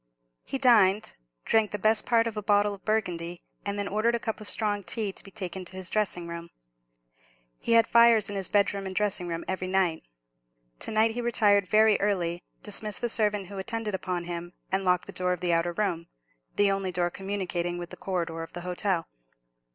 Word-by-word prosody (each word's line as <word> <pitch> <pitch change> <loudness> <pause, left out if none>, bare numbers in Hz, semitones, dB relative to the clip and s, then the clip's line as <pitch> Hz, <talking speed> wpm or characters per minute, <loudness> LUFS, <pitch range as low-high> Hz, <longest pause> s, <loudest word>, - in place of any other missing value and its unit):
He 270 - -3
dined, 215 -6 +4 0.3
drank 220 -2 +3
the 210 - -4
best 215 +2 +2
part 230 -1 +4
of 230 -2 -3
a 210 - -3
bottle 205 0 +2
of 195 - -11
Burgundy, 175 -6 -2 0.2
and 200 0 -3
then 200 -1 -2
ordered 220 +4 +1
a - - -1
cup 220 -1 -4
of 210 - -4
strong 205 -2 +1
tea 210 +1 -2
to - - -7
be 195 - -11
taken 190 -2 -5
to 185 - -9
his 185 -1 -3
dressing 195 -5 -1
room. 170 0 -7 1.1
He - - 0
had 230 -1 +6
fires 235 -2 +5
in 205 - -4
his 195 -2 0
bedroom 200 -1 +1
and 190 - -6
dressing 200 -4 0
room 165 -1 -4
every 185 0 -3
night. 185 -4 +1 0.8
To - - +2
night 220 +1 +3
he 240 +2 -4
retired 205 -5 +3
very 215 +1 +4
early, 175 -4 0 0.2
dismissed 210 -1 +1
the 240 - 0
servant 210 -3 0
who 195 +1 -8
attended 225 +1 -3
upon 180 -2 -2
him, 175 0 -6 0.2
and 190 0 +1
locked 180 -1 +2
the - - -9
door 180 0 0
of 180 - -5
the 175 -1 0
outer 165 +1 +1
room, 170 -3 -2 0.5
the 205 -1 +3
only 195 -1 -1
door 175 0 0
communicating 185 -3 -3
with 175 -1 -7
the - - -6
corridor 170 -3 -3
of 165 - -8
the 175 - -5
hotel. 180 -1 -1
195 Hz, 205 wpm, -27 LUFS, 180-215 Hz, 1.1 s, had